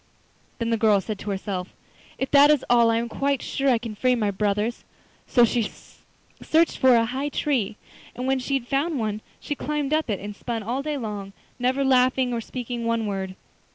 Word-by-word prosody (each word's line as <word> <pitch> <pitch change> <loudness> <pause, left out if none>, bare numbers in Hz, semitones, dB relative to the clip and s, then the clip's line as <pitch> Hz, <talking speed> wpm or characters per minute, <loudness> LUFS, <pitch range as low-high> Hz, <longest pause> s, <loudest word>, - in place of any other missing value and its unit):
Then 230 0 -2
the 230 - +2
girl 215 -3 +5
said 205 +1 -5
to 210 - -6
herself: 190 -2 -4 0.4
'If 265 - -3
that 285 +1 +7
is 300 -3 +3
all 235 -1 +5
I 230 - +2
am 235 +1 -1
quite 275 +2 -1
sure 275 0 0
I 245 - +4
can 230 -1 -6
free 250 +4 +2
my 210 -4 0
brothers.' 210 +3 -1 0.4
So 240 -2 +5
she 230 -2 -1 0.7
searched 325 +1 +2
for 260 -2 +6
a 230 -1 +4
high 265 +5 -2
tree, 255 -9 -1 0.4
and 250 - -4
when 265 0 +1
she 275 +2 -1
had 250 -3 -2
found 285 +4 0
one 215 -2 -2 0.2
she - - -3
climbed 295 0 -2
up 310 -4 +1
it 205 - -1
and 205 +1 -7
spun 225 +1 -4
all 245 +6 -2
day 300 0 -3
long, 205 -5 -5 0.3
never 260 +3 +1
laughing 255 -1 +3
or 230 - -1
speaking 240 0 -5
one 230 -1 0
word. 190 -2 -3
240 Hz, 205 wpm, -24 LUFS, 215-270 Hz, 0.7 s, that